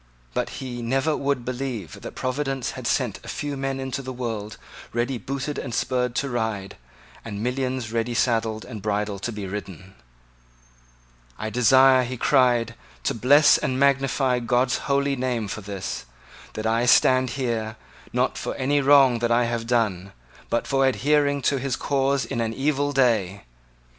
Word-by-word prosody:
But - - -1
he 120 -2 -5
never 135 +6 0
would 140 -3 -1
believe 125 -7 -5
that - - -8
Providence 135 0 -2
had - - -6
sent - - 0
a - - -12
few 145 -1 -4
men 135 0 -3
into 135 0 -3
the 130 -1 -6
world 115 -4 -5 0.4
ready 120 +2 -1
booted 140 +5 -4
and 120 -4 -5
spurred 125 -2 0
to 140 - 0
ride, 110 -5 -3 0.5
and 105 -2 -5
millions 130 -2 -2
ready 115 +1 -1
saddled 115 -2 0
and 110 -5 -8
bridled 105 -1 -2
to 120 - -3
be 105 -2 -6
ridden. 95 -1 -7 1.4
"I 110 0 -4
desire," 130 +2 +6
he 125 +1 -5
cried, 120 -4 +3 0.3
"to - - 0
bless 140 +6 +5
and 130 0 -1
magnify 135 -2 +2
God's 125 +1 +1
holy 140 0 +2
name 125 -4 -2
for 110 - -5
this, 95 -10 -5 0.5
that 110 - -5
I 115 +2 +1
stand 130 0 +5
here, 115 -4 -2 0.4
not - - 0
for - - -4
any 145 +2 +1
wrong 135 -3 +5
that 120 0 0
I 120 +1 +4
have 115 -1 -3
done, 100 -6 0 0.4
but 120 - 0
for 135 -1 +2
adhering 145 +1 +2
to 140 - +2
his 135 -1 -1
cause 135 -1 0
in 120 - -3
an 115 0 -2
evil 145 +1 0
day. 110 - +1
125 Hz, 165 wpm, -24 LUFS, 115-135 Hz, 1.4 s, desire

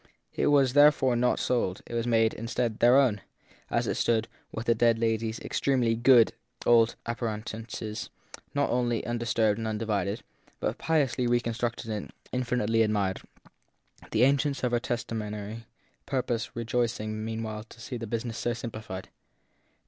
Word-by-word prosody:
It - - +1
was 140 -3 +4
therefore 145 -3 +5
not 125 +1 +2
sold; 110 -7 0
it - - -10
was 115 0 -1
made, 115 -1 +3
instead, 115 0 -2
their 120 +2 +6
own, 120 -8 +3 0.5
as - - +1
it - - 0
stood, 115 -1 +1 0.2
with 110 - -5
the 115 - +4
dead 115 0 +3
lady 115 0 0
s 110 - -6
extremely 125 -4 +1
good 120 0 +5 0.3
old 115 -1 +5
appurte 115 -2 -3
nances 110 -1 -6 0.5
not 145 0 +1
only 120 -2 0
undisturbed 115 -2 +1
and 110 - -2
undivided, 105 -1 -1 0.4
but - - -2
piously 135 -6 +1
reconstructed 120 -1 -1
and 105 -2 -4 0.2
infinitely 120 -3 +1
admired, 105 -3 +1 0.9
the 110 +2 +2
agents 140 +1 +2
of 125 - +1
her 120 - +2
testa 120 0 -3
mentary 105 +1 -5 0.4
purpose 125 -3 -2
rejoicing 115 -2 -1
meanwhile 110 -1 -4
to 115 - -16
see 125 +2 -5
the 115 -1 -6
business 115 +1 -3
so 120 - 0
simplified. 110 -5 -7
115 Hz, 150 wpm, -28 LUFS, 110-120 Hz, 0.9 s, their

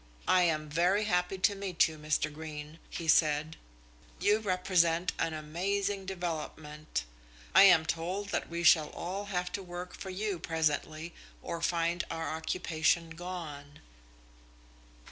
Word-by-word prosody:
"I 185 - +5
am 155 -3 +1
very 175 +7 +2
happy 180 -2 0
to 190 +2 +3
meet 195 -4 +2
you, 160 - -8
Mr. 150 0 0
Greene," 155 0 -8
he 165 - -5
said. 155 0 +3 0.6
"You 210 +1 +3
represent 180 -3 +2
an 160 - 0
amazing 190 +5 -2
development. 155 - -4 0.5
I - - +9
am 170 -4 +7
told 180 +5 -2
that - - -2
we 170 0 -3
shall 160 -3 +6
all 190 +4 -5
have 180 -3 -2
to 200 - -3
work 180 0 -7
for 190 - -7
you 195 -1 -2
presently 160 0 -1 0.3
or 170 -1 -4
find 170 0 +1
our 165 -1 -3
occupation 165 0 0
gone." 160 -4 -7
170 Hz, 135 wpm, -31 LUFS, 155-185 Hz, 0.6 s, I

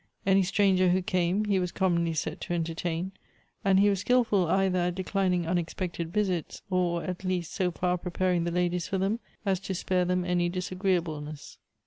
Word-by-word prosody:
Any 195 0 +5
stranger 190 -1 +3
who 185 +1 +2
came 185 +1 +1
he 200 -2 +2
was 180 -1 -1
commonly 170 -4 +1
set 155 0 -3
to 175 - -2
entertain, 165 +2 -2 0.5
and 195 -1 +4
he 205 - +5
was 200 -2 +2
skilful 220 -5 +2
either 185 0 +2
;it 180 - -2
declining 185 -2 0
unexpected 170 0 -2
visits, 185 -5 -1
or 175 -2 +1
at 180 0 -5
least 180 -3 -2
so 185 -1 +1
far 180 +1 -1
preparing 180 0 0
the 170 - -1
ladies 175 -1 0
for 195 - -1
them 195 +4 0 0.3
as 190 -2 +1
to 190 0 -4
spare 180 0 +1
them 180 0 0
any 175 -1 +1
disagreeable 180 -3 -1
ness. 150 0 -9
180 Hz, 180 wpm, -28 LUFS, 175-190 Hz, 0.5 s, Any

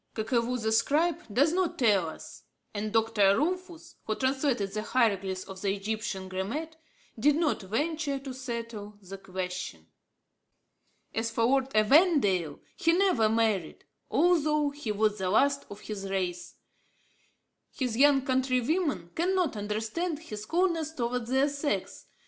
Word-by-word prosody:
Kakevou 235 +2 0
the 220 -1 -1
scribe 300 +9 +2
does 285 +9 +3
not 365 -1 0
tell 200 -9 +3
us, - - -11 0.3
and 215 0 -3
Dr. 220 -3 +3
Rumphius, 345 +1 -3
who 215 - -1
translated 260 -6 0
the 215 +1 -3
hieroglyphs 195 -6 0
of 190 -1 -10
the 200 -1 +1
Egyptian 205 -2 -4
grammat, 230 +13 -4 0.4
did 290 +5 +4
not 315 -5 +1
venture 285 - -1
to 270 -1 -7
settle 230 -5 -6
the 195 +1 -9
question. 185 - -5 1.3
As 225 +1 -1
for 225 0 -1
Lord 265 +2 +2
Evandale, 215 - +4 0.2
he 330 - +3
never 350 - +3
married, 220 -6 0 0.2
although 305 -4 +2
he 285 -6 -4
was 210 0 +1
the 185 -1 -1
last 280 +7 +2
of 205 +1 -10
his 195 -2 -6
race. 180 -2 -3 1.2
His 250 -4 -2
young 275 +1 +5
countrywomen 260 - 0
cannot 360 -4 +1
understand 220 - -2
his 215 -9 -8
coldness 335 -3 0
towards 240 -3 -2
their 265 +2 +3
sex. 285 0 -3
235 Hz, 135 wpm, -29 LUFS, 205-295 Hz, 1.3 s, young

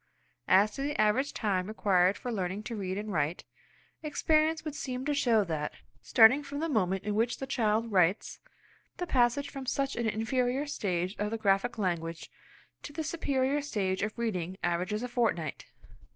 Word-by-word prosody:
As 200 +3 +5
to 275 - -6
the 285 -2 -2
average 215 +7 +2
time 190 -4 -1
required 195 -3 +2
for 250 - -5
learning 195 -1 -3
to 230 - -5
read 190 -2 -3
and 210 0 -4
write, 155 +1 -1 0.6
experience 315 +1 +1
would 305 - -3
seem 255 -2 -4
to 295 - +1
show 235 -6 +3
that, 155 -4 -3 0.3
starting 240 +5 +6
from 285 0 -7
the 325 - -1
moment 195 - 0
in 210 - -2
which 230 +3 +1
the 270 - -5
child 230 -3 0
writes, 185 0 +2 0.6
the 355 - -2
passage 260 -1 +1
from 270 -1 -7
such 275 +1 -1
an 235 -1 -1
inferior 250 +5 0
stage 185 -8 -2
of 210 0 0
the 225 - -2
graphic 220 +3 +1
language 170 -4 -3 0.5
to - - -8
the 315 +2 -4
superior 285 -3 0
state 195 -9 -1
of 215 +2 -3
reading 190 -6 -2
averages 180 +6 -1
a - - -2
fortnight. 220 - -1
220 Hz, 175 wpm, -30 LUFS, 190-270 Hz, 0.6 s, starting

